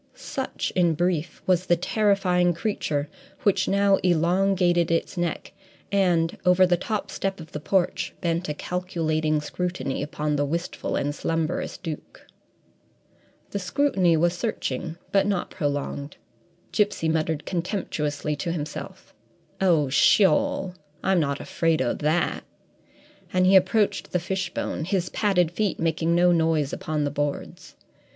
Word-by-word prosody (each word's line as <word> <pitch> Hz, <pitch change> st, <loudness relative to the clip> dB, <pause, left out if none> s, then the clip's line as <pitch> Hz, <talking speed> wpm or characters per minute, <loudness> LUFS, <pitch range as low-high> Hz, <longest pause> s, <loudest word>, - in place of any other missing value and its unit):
Such, -, -, -4 dB
in 175 Hz, -3 st, +3 dB
brief, 175 Hz, -1 st, -1 dB
was 185 Hz, 0 st, +2 dB
the 175 Hz, -, +5 dB
terrifying 180 Hz, -2 st, +2 dB
creature 155 Hz, -6 st, -2 dB, 0.4 s
which 195 Hz, -2 st, +2 dB
now 200 Hz, 0 st, +4 dB
elongated 175 Hz, 0 st, +2 dB
its 165 Hz, +3 st, 0 dB
neck, 175 Hz, -2 st, -3 dB, 0.4 s
and, 175 Hz, -4 st, +2 dB
over 180 Hz, +1 st, +5 dB
the 180 Hz, -1 st, +3 dB
top 210 Hz, +4 st, -3 dB
step 195 Hz, -1 st, -3 dB
of 160 Hz, -1 st, -10 dB
the 150 Hz, -, -5 dB
porch, 180 Hz, +3 st, 0 dB
bent 170 Hz, 0 st, -1 dB
a 150 Hz, -, -2 dB
calculating 160 Hz, -3 st, -1 dB
scrutiny 150 Hz, -4 st, -3 dB
upon 150 Hz, 0 st, -2 dB
the 145 Hz, -, +1 dB
wistful 170 Hz, +5 st, -3 dB
and 145 Hz, +1 st, -1 dB
slumberous 165 Hz, +2 st, -2 dB
Duke. 160 Hz, -5 st, -8 dB, 1.3 s
The 200 Hz, -, -2 dB
scrutiny 185 Hz, -, +2 dB
was 170 Hz, +2 st, +2 dB
searching 170 Hz, -, -3 dB
but 195 Hz, 0 st, +3 dB
not 195 Hz, -3 st, -1 dB
prolonged. 145 Hz, -2 st, -3 dB, 0.5 s
Gipsy 205 Hz, -6 st, +1 dB
muttered 160 Hz, -1 st, 0 dB
contemptuously 155 Hz, -5 st, -2 dB
to 170 Hz, +3 st, -2 dB
himself, 155 Hz, -3 st, -6 dB, 0.5 s
"Oh, 165 Hz, -6 st, +3 dB
sheol; 215 Hz, -, +3 dB, 0.3 s
I'm 190 Hz, -2 st, +3 dB
not 140 Hz, -3 st, 0 dB
afraid 165 Hz, -1 st, 0 dB
o' 130 Hz, -2 st, +1 dB
that!" 155 Hz, +3 st, 0 dB, 0.9 s
And 185 Hz, 0 st, +3 dB
he 190 Hz, +1 st, +5 dB
approached 195 Hz, +3 st, +2 dB
the 180 Hz, -, +2 dB
fishbone, 180 Hz, -3 st, -3 dB
his 180 Hz, -1 st, -1 dB
padded 180 Hz, -6 st, +1 dB
feet 205 Hz, +1 st, -1 dB
making 165 Hz, 0 st, +1 dB
no 175 Hz, +1 st, +5 dB
noise 160 Hz, -4 st, +1 dB
upon 155 Hz, -1 st, -2 dB
the 145 Hz, -, -1 dB
boards. 145 Hz, 0 st, -4 dB
175 Hz, 135 wpm, -25 LUFS, 155-185 Hz, 1.3 s, the